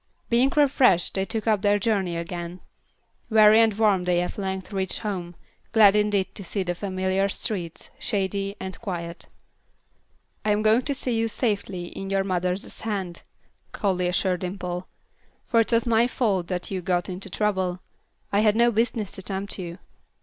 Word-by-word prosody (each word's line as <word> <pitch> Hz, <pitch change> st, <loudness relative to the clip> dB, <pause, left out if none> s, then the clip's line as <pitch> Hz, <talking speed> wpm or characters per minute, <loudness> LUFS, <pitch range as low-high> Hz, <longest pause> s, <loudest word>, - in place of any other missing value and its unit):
Being 250 Hz, +4 st, +4 dB
refreshed 260 Hz, -, +4 dB
they 190 Hz, 0 st, 0 dB
took 220 Hz, +1 st, -3 dB
up 215 Hz, -3 st, +2 dB
their 205 Hz, 0 st, +3 dB
journey 195 Hz, -5 st, 0 dB
again. 170 Hz, +1 st, -5 dB, 0.7 s
Weary 215 Hz, 0 st, +7 dB
and 225 Hz, -1 st, +4 dB
warm 205 Hz, -5 st, +3 dB
they 180 Hz, -1 st, +2 dB
at 180 Hz, -, -3 dB
length 190 Hz, 0 st, -4 dB
reached 190 Hz, -1 st, 0 dB
home, 180 Hz, -5 st, -4 dB, 0.4 s
glad 210 Hz, -3 st, +7 dB
indeed 210 Hz, -2 st, +1 dB
to 200 Hz, -, -8 dB
see 195 Hz, +1 st, -2 dB
the 175 Hz, -1 st, -2 dB
familiar 190 Hz, +1 st, -1 dB
streets, 180 Hz, -5 st, -4 dB
shady 195 Hz, 0 st, -1 dB
and 190 Hz, -1 st, -7 dB
quiet. 170 Hz, -5 st, -5 dB, 1.2 s
"I 215 Hz, -, 0 dB
am 210 Hz, +1 st, 0 dB
going 220 Hz, +3 st, +5 dB
to 280 Hz, -, -1 dB
see 255 Hz, -3 st, -1 dB
you 225 Hz, 0 st, +1 dB
safely 200 Hz, -6 st, -2 dB
in 195 Hz, +2 st, -7 dB
your 195 Hz, 0 st, +1 dB
mother's 185 Hz, 0 st, -2 dB
hands," 195 Hz, -6 st, -3 dB, 0.5 s
Callie 185 Hz, -3 st, 0 dB
assured 180 Hz, 0 st, 0 dB
Dimple; 180 Hz, -1 st, -4 dB, 0.6 s
"for 230 Hz, -, +2 dB
it 225 Hz, -, +2 dB
was 230 Hz, 0 st, +3 dB
my 235 Hz, 0 st, +3 dB
fault 200 Hz, -8 st, 0 dB
that 180 Hz, 0 st, -4 dB
you 190 Hz, -1 st, -2 dB
got 180 Hz, -1 st, 0 dB
into 190 Hz, +2 st, -5 dB
trouble. 190 Hz, -3 st, 0 dB, 0.5 s
I 200 Hz, -, +4 dB
had 210 Hz, 0 st, +4 dB
no 235 Hz, +1 st, +4 dB
business 225 Hz, -2 st, 0 dB
to -, -, -6 dB
tempt 195 Hz, +1 st, -4 dB
you." 170 Hz, -1 st, -6 dB
195 Hz, 170 wpm, -25 LUFS, 180-215 Hz, 1.2 s, Weary